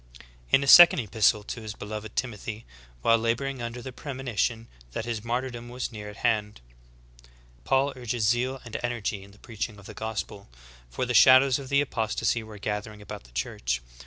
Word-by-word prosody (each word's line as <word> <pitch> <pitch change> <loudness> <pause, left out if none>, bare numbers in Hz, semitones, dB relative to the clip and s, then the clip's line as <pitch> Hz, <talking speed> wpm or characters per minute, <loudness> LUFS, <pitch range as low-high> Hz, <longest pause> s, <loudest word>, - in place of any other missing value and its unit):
In 135 - +4
a - - -3
second 175 +5 +10
epistle 110 -2 +2
to 115 +2 -6
his 110 -1 -7
beloved 105 0 -7
Timothy, 110 -2 -4 0.4
while 115 0 +4
laboring 120 +3 -1
under 120 +1 -5
the 130 - -6
premonition 125 -4 -3 0.3
that 110 - -3
his 115 -3 -4
martyrdom 120 0 -3
was 125 +1 -4
near 105 -2 -8
at 105 - -10
hand, 105 -2 0 1.1
Paul 135 +1 +2
urges 120 -3 -2
zeal 125 +4 +1
and 115 - -9
energy 120 -4 -2
in 100 - -14
the 100 - -19
preaching 110 0 -6
of 100 - -15
the 110 - -9
gospel; 105 - -5 0.4
for 65 - -2
the 125 - -2
shadows 130 +3 +7
of 135 -2 -9
the 140 0 +4
apostasy 115 -3 -1
were 110 -1 -11
gathering 105 +1 -4
about 105 -11 -9
the - - -18
Church. - - -2
115 Hz, 180 wpm, -27 LUFS, 105-125 Hz, 1.1 s, second